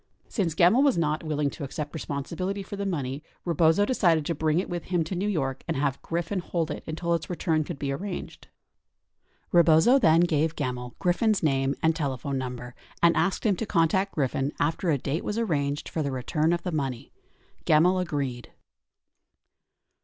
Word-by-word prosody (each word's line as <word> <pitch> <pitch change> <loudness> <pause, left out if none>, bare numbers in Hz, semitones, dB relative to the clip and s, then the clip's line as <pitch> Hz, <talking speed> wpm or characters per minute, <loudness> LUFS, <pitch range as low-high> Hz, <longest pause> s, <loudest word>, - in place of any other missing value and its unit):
Since. 175 -8 -1
Gemmill 180 +10 +5
was 280 -7 +3
not. 155 -2 0
willing 150 -2 -1
to - - -8
accept 145 +2 -5
responsibility 170 +6 -4
for 200 - -7
the 200 0 -3
money, 140 -6 -3 0.2
Rebozo 170 +3 +3
decided 170 - +2
to 170 - 0
bring 155 0 0
it 185 - 0
with 175 -1 -4
him 175 -3 0
to 160 - -5
New 185 +3 -1
York 135 -8 -2
and - - -1
have 140 -1 -1
Griffin 170 +3 -2
hold 170 -2 -2
it - - -6
until 170 +2 -1
its 165 -2 -2
return 165 -3 0
could 165 0 -6
be 140 0 -2
arranged. 180 +7 -6 1.0
Rebozo 170 - +6
then 165 -7 +5
gave 160 -2 +1
Gemmill 125 -3 -4
Griffin's 190 +3 +1
name 135 -2 +1
and 160 0 +3
telephone 135 -2 -2
number 125 -1 -6 0.3
and 170 0 +6
asked 195 - 0
him 205 -3 +3
to 225 - -3
contact 170 +4 +1
Griffin 135 -1 0
after 160 +4 0
a 150 - +3
date 140 +5 -3
was 210 - -3
arranged 145 -10 -1
for 160 - -3
the 140 -2 -1
return 150 +5 0
of 170 0 -1
the 180 - -2
money. 135 -6 -3 0.6
Gemmill 175 +5 +4
agreed. 140 -8 -3
160 Hz, 180 wpm, -26 LUFS, 140-175 Hz, 1.0 s, Rebozo